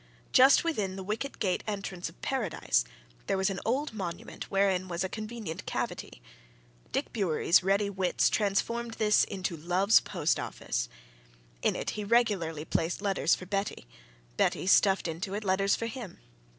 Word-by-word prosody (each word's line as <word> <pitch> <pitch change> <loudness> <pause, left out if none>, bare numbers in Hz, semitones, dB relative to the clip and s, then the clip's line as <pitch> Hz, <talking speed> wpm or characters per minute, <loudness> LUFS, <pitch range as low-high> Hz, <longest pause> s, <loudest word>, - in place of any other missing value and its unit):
Just 265 +2 +7
within 210 - -1
the 190 - -6
wicket 220 +8 -4
gate 185 -3 0
entrance 195 -4 -4
of 165 - -19
Paradise 200 - 0 0.4
there - - +1
was 190 +1 +1
an 190 - -4
old 265 +4 -1
monument 175 -5 -6
wherein 195 -2 +2
was 175 0 -2
a - - 0
convenient 215 -5 -6
cavity - - -4 0.7
Dick - - -2
Bewery's 175 -4 +3
ready 200 +2 +2
wits 190 -2 +1
transformed 230 +3 0
this 210 -1 +4
into 185 -3 -3
love's 180 +6 +4
post - - -1
office. - - -3 0.7
In - - +1
it - - -2
he 210 - -4
regularly 200 -9 +1
placed 170 +5 -1
letters 195 -4 +2
for 185 - -9
Betty: 195 - -3 0.5
Betty - - +1
stuffed 195 0 +4
into 170 +4 -4
it 215 - -3
letters 195 0 +2
for 230 - -3
him. 230 -5 -7
195 Hz, 155 wpm, -29 LUFS, 180-215 Hz, 0.7 s, Just